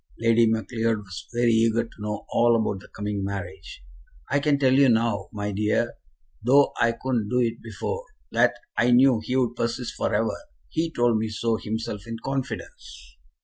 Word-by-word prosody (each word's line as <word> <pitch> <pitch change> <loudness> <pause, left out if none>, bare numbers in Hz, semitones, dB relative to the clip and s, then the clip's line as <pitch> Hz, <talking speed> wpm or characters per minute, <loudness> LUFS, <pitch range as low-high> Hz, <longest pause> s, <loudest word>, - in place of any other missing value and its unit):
Lady 115 0 +4
Macleod 110 +1 0
was 95 -4 -9
very 120 0 +2
eager 115 0 +3
to 115 - -14
know 105 -1 -4
all 120 0 +4
about 105 -3 -2
the - - -14
coming 105 -1 -4
marriage. 100 -9 -6 0.5
"I 140 - +3
can 145 0 +2
tell 130 -2 +3
you 135 0 +5
now, 115 -3 +1
my 105 -1 -3
dear, 105 +2 0 0.5
though 135 +5 +4
I 115 0 +4
couldn't 115 -4 -2
do 125 - +1
it 115 -2 0
before, 460 - -5 0.3
that - - +3 0.2
I 120 - +3
knew 125 -1 +5
he'd 125 -1 0
persist 120 +1 -2
for - - -2
ever. 110 +2 0 0.3
He 165 +1 -1
told 120 -6 +2
me 110 0 -2
so 110 +1 -1
himself 105 -2 -5
in 115 0 -5
confidence." 135 +2 -6
115 Hz, 175 wpm, -25 LUFS, 105-125 Hz, 0.5 s, you